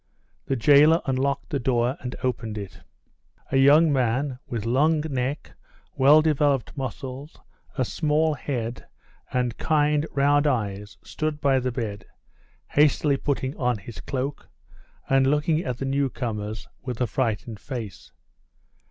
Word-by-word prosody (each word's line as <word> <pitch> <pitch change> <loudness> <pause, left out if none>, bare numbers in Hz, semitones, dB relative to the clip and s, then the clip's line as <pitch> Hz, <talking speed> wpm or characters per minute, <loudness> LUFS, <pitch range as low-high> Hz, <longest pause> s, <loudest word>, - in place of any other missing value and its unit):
The 135 - -1
jailer 145 +6 +6
unlocked 135 +1 -1
the 140 - 0
door 120 0 +1
and 125 0 -6
opened 115 -4 -2
it. 100 -2 -8 0.7
A 135 - +2
young 145 +3 +6
man, 130 +1 0
with 115 -3 -4
long 150 +6 +2
neck, 140 -2 -3 0.4
well 145 +4 +6
developed 145 -4 +1
muscles, 135 +2 -6 0.4
a 130 - +1
small 155 +3 +1
head, 120 -5 -4 0.4
and 125 -2 -1
kind, 150 0 +2
round 145 +1 +3
eyes, 105 -5 -2
stood 155 -1 -3
by 135 -2 +3
the 125 0 -2
bed, 110 -5 -5 0.6
hastily 145 -1 +3
putting 135 -1 -2
on 125 -3 0
his 105 +3 -10
cloak, 140 +1 -4 0.6
and 135 0 +3
looking 150 +3 +2
at 125 -2 -3
the 135 - -4
newcomers 120 -6 -2
with 125 -3 -5
a 125 - +2
frightened 110 -2 -2
face. 115 -5 -7
135 Hz, 135 wpm, -25 LUFS, 120-145 Hz, 0.7 s, jailer